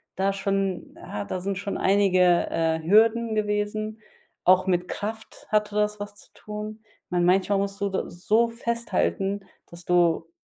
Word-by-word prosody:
da 195 +1 +1
schon 195 -2 -2
ja, 105 -1 -6
da 180 - -4
sind 195 0 -2
schon 200 0 -3
einige, 195 -1 +3 0.3
äh, 160 0 0
Hürden 220 +4 +4
gewesen. 215 +1 -1 0.5
Auch 185 +1 +5
mit 180 -1 +1
Kraft 220 +2 -6
hatte 210 -1 +1
das 210 0 +1
was 205 0 -7
zu - - -18
tun. 215 +1 -7 0.3
Meine, 175 -1 +1
manchmal 195 +2 +3
musst 200 0 -3
du 200 - +1
da 190 - -3
so 215 +7 +2
festhalten, 230 -4 -1 0.3
dass 170 0 -12
du 170 -2 +2
200 Hz, 155 wpm, -25 LUFS, 185-215 Hz, 0.5 s, Auch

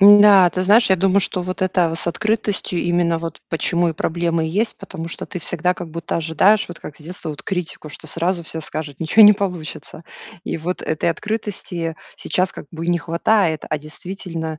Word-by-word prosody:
Да, 200 -2 +8
ты 185 - -3
знаешь, 205 +4 +5
я 190 - +5
думаю 195 +2 +3
что 185 - 0
вот 185 +1 -4
это 175 -3 +1
с 170 - +3
открытостью 205 -1 0
именно 175 -1 +1
вот 165 0 -6
почему 170 +1 +1
и 165 - -1
проблемы 170 0 -1
есть, 205 +8 -1
потому 180 -5 -7
что - - -6
ты 180 - -6
всегда 175 +1 +1
как 175 -2 -8
будто 170 +1 -4
ожидаешь, 190 +6 +3
вот 175 - -8
как 150 - -9
с - - -14
детства 165 -1 -5
вот 150 0 -9
критику, 180 -4 -4
что - - -10
сразу 170 +1 -1
все 160 0 -4
скажут: 150 -2 -6
"Ниче 165 +7 +5
не 210 0 +10
получится." 180 -5 -5 0.4
И - - -3
вот 180 +3 -4
этой 155 +2 -1
открытости 175 -4 -3 0.2
сейчас 185 +1 0
как - - -10
бы 165 0 -6
и - - +2
не 175 - +2
хватает. 170 0 +1
А 155 - 0
действительно 160 0 -6
175 Hz, 200 wpm, -20 LUFS, 165-190 Hz, 0.4 s, не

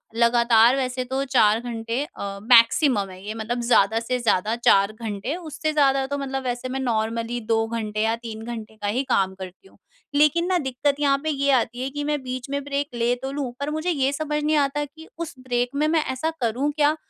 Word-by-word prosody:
लगातार 235 0 +5
वैसे 255 -1 -2
तो 265 +2 -2
4 225 -5 +4
घंटे 235 +2 -3
अ, 200 - -7
मैक्सिमम 230 -2 +5
है 185 0 -11
ये 215 - -4
मतलब 225 +2 -3
ज़्यादा 225 -2 +3
से 250 +2 -2
ज़्यादा 220 -2 +1
4 200 -4 +4
घंटे। 220 +4 -4
उससे 315 -2 -3
ज़्यादा 275 -2 +3
तो 285 +1 -3
मतलब 270 -1 -3
वैसे 245 0 -3
मैं 265 +1 -3
नॉर्मली 230 -1 -1
2 225 0 +3
घंटे 215 -2 -4
या 225 +1 +2
3 230 -2 -8
घंटे 225 -2 -7
का 205 - -2
ही 250 +7 0
काम 190 -4 +2
करती 190 - -10
हूँ। - - -23 0.4
लेकिन 300 +4 +4
ना 370 -1 +2
दिक्कत 275 -1 0
यहाँ 280 -1 +3
पे 315 - -1
ये 280 -1 +1
आती 245 -1 +1
है 265 - -2
कि 290 +2 -4
मैं 295 -1 -1
बीच 255 0 -5
में 280 0 -2
ब्रेक 285 0 -2
ले 235 +1 +1
तो 265 0 -4
लूँ 280 -3 -3
पर 285 - -2
मुझे 315 +3 -2
ये 275 -5 +1
समझ 300 0 -2
नहीं 305 +1 +2
आता 290 +1 +1
कि 320 +3 -15
उस 335 -2 -5
ब्रेक 245 -1 -1
में 300 +2 +2
मैं 315 -1 +2
ऐसा 260 +5 -1
करूँ 245 +5 0
क्या 300 0 +2
255 Hz, 220 wpm, -23 LUFS, 230-285 Hz, 0.4 s, लगातार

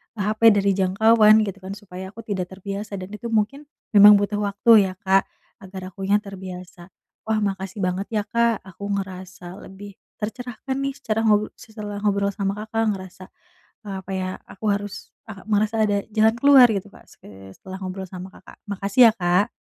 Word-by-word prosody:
HP 215 +1 +3
dari 200 0 +2
jangkauan 215 +3 +4
gitu 200 -1 -5
kan, 190 +1 -7
supaya 190 -2 -9
aku 230 - -9
tidak 190 -4 -3
terbiasa 200 +2 -6
dan 185 +1 -8
itu 210 +3 -7
mungkin, 230 +7 -1 0.2
memang 205 0 +9
butuh 205 +1 0
waktu 205 0 +4
ya 185 - -6
Kak 195 0 +3 0.3
agar 190 -1 -9
akunya 195 +2 0
terbiasa. 185 -2 -10 0.4
Wah, 215 -1 +1
makasih 195 0 -3
banget 180 +2 -2
ya 215 -2 -1
Kak. 235 -1 0
Aku 195 +2 -9
ngerasa 185 -1 -6
lebih 200 +1 -11 0.2
tercerahkan 245 +4 -5
nih, 275 0 -2
secara 225 -6 -2
ngob 210 0 +2
setelah 210 -3 -8
ngobrol 200 -1 0
sama 195 0 -2
Kakak 220 +1 -2
ngerasa, 185 0 -11 0.6
apa 195 -1 -7
ya, 185 -1 -2 0.2
aku 215 +3 -7
harus 205 0 -7
ah 205 -4 -10
merasa 215 +1 +1
ada 205 -1 +1
jalan 220 +1 +3
keluar 275 -2 +8
gitu 200 -1 -2
Kak. - - -17
Se 95 -1 -15
setelah 190 0 -10
ngobrol 190 +1 -5
sama 185 0 -8
Kakak. - - -16
Makasih 200 +4 +4
ya - - -6
Kak. 180 +3 +1
200 Hz, 170 wpm, -22 LUFS, 190-215 Hz, 0.6 s, memang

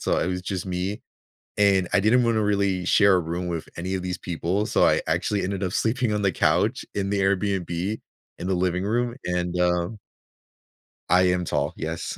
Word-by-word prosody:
so - - 0
it - - 0
was 90 0 -2
just 90 -1 -4
me. 95 +2 -3 0.6
And 95 -3 +3
I 100 - +5
didn't 115 +5 +4
wanna 115 -2 +2
really 100 -3 +1
share 100 +1 +5
a - - +2
room 85 +2 -4
with 85 -2 -4
any 90 +3 -3
of 95 - -2
these 90 0 -3
people, 90 +4 -2
so - - +2
I - - +3
actually 105 -1 0
ended 100 +1 -3
up 90 - -1
sleeping 115 +1 0
on 105 - 0
the 100 - +3
couch, - - +1
in 100 -1 -1
the 100 - 0
Airbnb, 95 0 0 0.4
in 90 - -5
the - - +1
living 90 0 0
room, 120 +3 0
and, 90 0 -1
um 90 +4 0 1.1
I 90 +1 +5
am 90 -1 -1
tall. 75 -1 -1
Yes. 80 +1 -4
95 Hz, 195 wpm, -24 LUFS, 90-100 Hz, 1.1 s, I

